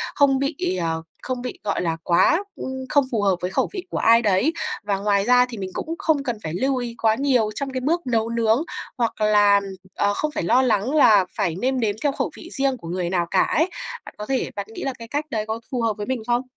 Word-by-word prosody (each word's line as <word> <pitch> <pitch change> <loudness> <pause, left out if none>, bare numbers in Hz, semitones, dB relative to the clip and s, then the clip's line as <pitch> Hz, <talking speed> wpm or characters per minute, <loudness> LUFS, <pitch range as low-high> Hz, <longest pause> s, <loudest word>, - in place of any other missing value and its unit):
không 275 -2 +4
bị, 280 - -1
ờ, 160 -1 -2 0.2
không 255 -1 -3
bị, 250 0 -6
gọi 210 - -1
là, 165 -2 -1
quá, 320 - +3
ưm, 260 -1 -5
không 285 -2 +3
phù 225 - 0
hợp 195 -2 +3
với 180 +1 -2
khẩu - - 0
vị 375 - -4
của - - -3
ai 230 +1 +5
đấy. 210 - +2 0.3
Và 205 -1 0
ngoài 200 0 +1
ra 250 +1 +5
thì 235 - -7
mình 190 -2 -4
cũng 325 +2 -4
không 315 -7 +1
cần 240 -4 -2
phải 155 - -4
lưu 265 +8 0
ý 240 -2 -4
quá 220 -1 +4
nhiều 250 -5 +2
trong 280 -1 -3
cái 255 -1 -3
bước 330 +6 +1
nấu 230 -2 +1
nướng 230 +3 +2 0.3
hoặc 235 -3 -1
là, 205 -1 +5
ừm, 195 - -7 0.2
ờ, 205 0 +1
không 305 +8 -2
phải - - -3
lo 250 +9 +4
lắng 230 -1 +1
là 215 -10 +6
phải 170 -4 0
nêm 255 +6 0
nếm 210 -4 0
theo 290 - +3
khẩu - - -2
vị - - -10
riêng 270 -1 +1
của 170 - -11
người 175 0 -2
nào 175 -2 +1
cả 190 - +4
ấy. 325 +4 +1 0.4
Bạn - - -10
có 210 - -5
thể 265 +2 -1
bạn 200 - -3
nghĩ - - -6
là 270 -1 -2
cái 230 - -8
cách 290 +5 -2
đấy 220 -5 -2
có 220 +1 -3
phù 250 -3 -1
hợp 225 -2 +1
với 205 - -4
mình 260 -3 -2
không? 240 0 +2
230 Hz, 260 wpm, -23 LUFS, 205-270 Hz, 0.4 s, là